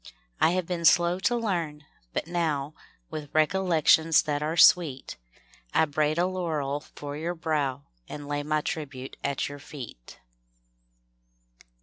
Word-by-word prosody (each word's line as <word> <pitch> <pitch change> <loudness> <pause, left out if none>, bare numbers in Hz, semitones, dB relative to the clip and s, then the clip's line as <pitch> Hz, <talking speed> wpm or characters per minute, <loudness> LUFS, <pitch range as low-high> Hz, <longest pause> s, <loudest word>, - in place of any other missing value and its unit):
I - - +5
have 185 - -1
been 175 -1 -3
slow 175 +2 +4
to 240 +5 +1
learn, 170 -10 -2 0.3
but - - -2
now, 160 -4 -1 0.4
With 150 -2 -6
recollections 160 -1 +4
■ - - -23
that 145 -1 -1
are 155 +3 -2
sweet, 160 -7 +4 0.6
I 160 - +5
braid 150 +1 0
a 175 - +3
laurel 160 -6 -2 0.2
for 145 0 -6
your 165 +4 -3
brow 150 -5 -1 0.3
And 145 -1 -7
lay 145 0 -2
my 155 +1 0
tribute 135 -4 -5
at 140 -1 -1
your 145 0 -8
eet. 120 - -9
155 Hz, 140 wpm, -27 LUFS, 145-170 Hz, 0.6 s, I